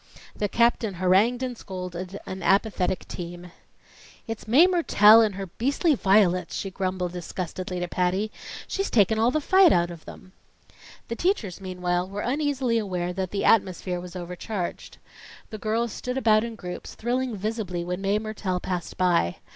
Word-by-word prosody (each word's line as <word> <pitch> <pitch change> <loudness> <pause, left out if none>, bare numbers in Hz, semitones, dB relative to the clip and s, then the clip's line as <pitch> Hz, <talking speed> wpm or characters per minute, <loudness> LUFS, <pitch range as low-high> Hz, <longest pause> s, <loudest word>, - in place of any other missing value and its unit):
The 205 - -1
captain 235 -3 +2
harangued 195 +8 +3
and 250 -1 -3
scolded 180 -2 -6
an 190 0 -6
apathetic 190 -1 +1
team. 175 0 -8 0.7
"It's 225 -2 -6
Mae 270 +10 +7
Mertelle 230 - +6
and 210 -3 -1
her 195 0 -4
beastly 275 - 0
violets!" 190 - +2
she 195 - -4
disgustedly 180 -1 -4
grumbled 175 -1 -4
to - - -9
Patty. 185 +4 0 0.4
"She's 390 +1 -2
taken 220 0 +3
all 230 +2 +4
the 310 - +1
fight 375 +3 +5
out 175 0 +2
of 170 -2 -11
them." 185 - -12 0.8
The 230 - -4
teachers, 235 - -1
meanwhile, 180 -1 -2
were 200 +1 -4
uneasily 265 -3 0
aware 180 -4 -3
that 185 0 -3
the 200 - -2
atmosphere 185 -4 +2
was 180 0 -10
overcharged. 180 +2 -5 0.5
The 215 - -6
girls 225 +2 -1
stood 250 +4 -4
about 215 -4 +4
in 230 -1 -5
groups, 180 -4 -8
thrilling 245 +1 -1
visibly 200 -4 -3
when 180 +2 -3
Mae 200 +1 +1
Mertelle 215 -4 -3
passed 180 -2 -4
by. 175 - +2
195 Hz, 160 wpm, -25 LUFS, 180-230 Hz, 0.8 s, Mae